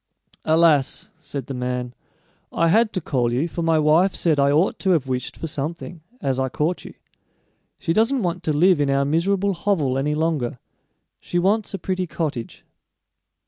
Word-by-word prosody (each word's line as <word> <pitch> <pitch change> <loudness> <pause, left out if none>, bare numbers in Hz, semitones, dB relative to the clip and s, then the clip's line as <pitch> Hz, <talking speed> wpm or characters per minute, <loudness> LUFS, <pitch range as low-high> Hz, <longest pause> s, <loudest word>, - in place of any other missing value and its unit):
"Alas!" 160 -4 +3
said 140 -2 -6
the 135 - -6
man; 125 -1 -3 0.6
"I 165 - +2
had 220 +4 +3
to 185 - -2
call 125 -5 0
you, 130 +7 0
for 170 - -5
my 165 -1 +2
wife 160 +5 +3
said 155 -4 +1
I 140 0 +4
ought 160 +6 +2
to 190 - -1
have 155 -6 +1
wished 130 -1 -4
for - - -5
something, 165 +3 -5 0.2
as 135 - -1
I 130 0 0
caught 155 +7 -1
you. - - -11 0.8
She 165 - -1
doesn't 230 +5 +2
want 175 0 -2
to 155 - +2
live 170 +2 +4
in 140 - +1
our 140 0 +2
miserable 195 +6 +1
hovel 165 -8 0
any 150 +2 0
longer; 150 -6 -1 0.6
she 175 - -4
wants 200 +3 +1
a - - -3
pretty 185 0 -2
cottage." 150 -8 -4
160 Hz, 180 wpm, -22 LUFS, 140-180 Hz, 0.8 s, I